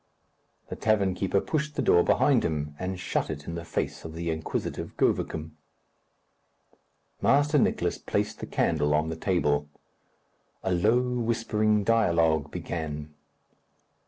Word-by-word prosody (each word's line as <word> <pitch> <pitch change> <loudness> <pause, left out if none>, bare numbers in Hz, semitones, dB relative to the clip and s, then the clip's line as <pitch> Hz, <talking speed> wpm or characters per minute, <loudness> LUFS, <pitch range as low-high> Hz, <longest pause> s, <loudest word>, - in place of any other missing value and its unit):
The - - -4
tavern 100 -4 +2
keeper 95 +1 +1
pushed 150 +3 -2
the - - 0
door 85 - +5
behind - - +3
him, 75 -2 -2
and 95 0 -3
shut - - -1
it 75 -2 -5
in 85 - -5
the 85 0 -5
face 85 - -3
of 80 0 -8
the 85 0 -2
inquisitive 80 0 -4
Govicum. 80 0 0 1.7
Master 145 +2 +4
Nicless - - +1
placed - - -1
the - - -6
candle 75 -2 +1
on 80 +1 +1
the 80 - -3
table. 75 -5 0 0.9
A 95 - -1
low 105 +7 +3
whispering 115 -4 +1
dialogue 85 -9 +2
began. 75 -3 -5
85 Hz, 130 wpm, -27 LUFS, 80-110 Hz, 1.7 s, door